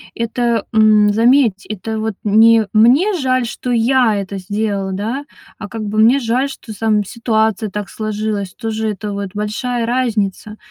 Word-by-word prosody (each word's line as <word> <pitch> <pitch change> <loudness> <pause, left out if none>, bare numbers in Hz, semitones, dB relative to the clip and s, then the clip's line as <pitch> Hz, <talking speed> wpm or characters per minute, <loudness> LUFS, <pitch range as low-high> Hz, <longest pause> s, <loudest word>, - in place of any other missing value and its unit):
это, 235 -1 -1
м, 215 -1 +5
заметь, 230 -2 +3
это 215 +2 -5
вот 220 0 -2
не: 220 +1 +5
"Мне 255 - +4
жаль, 255 -2 +1
что 245 +2 -5
я 240 -1 +3
это 200 0 -4
сделал- 200 0 -3
да, 225 +9 -4 0.3
а 210 - -7
как 225 +1 -6
бы- 210 0 -4
мне 235 +5 +5
жаль, 255 +3 0
что, 235 -4 -9
там, 215 -2 +1
ситуация 220 -1 -1
так 205 0 -5
сложилась". 215 -3 -3
Тоже 220 -1 -3
это 210 +1 -6
вот 200 -1 -4
большая 230 +3 -2
разница. 220 -4 -2
220 Hz, 155 wpm, -17 LUFS, 210-235 Hz, 0.3 s, м